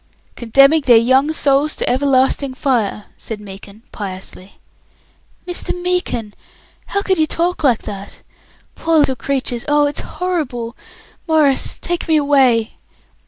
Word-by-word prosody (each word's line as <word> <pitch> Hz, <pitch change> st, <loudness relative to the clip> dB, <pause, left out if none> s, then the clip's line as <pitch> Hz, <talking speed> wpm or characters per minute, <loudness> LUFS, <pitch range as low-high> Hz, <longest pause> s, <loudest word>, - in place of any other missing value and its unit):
"Condemning 275 Hz, +6 st, +4 dB
their 250 Hz, -4 st, +5 dB
young 260 Hz, +6 st, +3 dB
souls 290 Hz, 0 st, +2 dB
to -, -, -3 dB
everlasting 265 Hz, 0 st, +1 dB
fire," 230 Hz, -6 st, -1 dB
said 220 Hz, -2 st, -6 dB
Meekin, 200 Hz, +1 st, -12 dB
piously. 190 Hz, -1 st, -7 dB, 0.9 s
"Mr. 355 Hz, 0 st, -4 dB
Meekin! 355 Hz, -12 st, -2 dB, 0.5 s
How 400 Hz, 0 st, -2 dB
can 380 Hz, -4 st, 0 dB
you 310 Hz, -, +3 dB
talk 345 Hz, +1 st, -1 dB
like 250 Hz, -6 st, +2 dB
that? 200 Hz, -1 st, -9 dB, 0.5 s
Poor 330 Hz, 0 st, 0 dB
little 285 Hz, -3 st, +3 dB
creatures! 255 Hz, -1 st, -3 dB
Oh, 295 Hz, 0 st, +3 dB
it's 290 Hz, 0 st, -2 dB
horrible! 275 Hz, -10 st, -4 dB, 0.5 s
Maurice, 305 Hz, -4 st, +2 dB
take 350 Hz, 0 st, -3 dB
me 320 Hz, -1 st, +3 dB
away." 265 Hz, -6 st, +2 dB
270 Hz, 125 wpm, -17 LUFS, 230-310 Hz, 0.9 s, their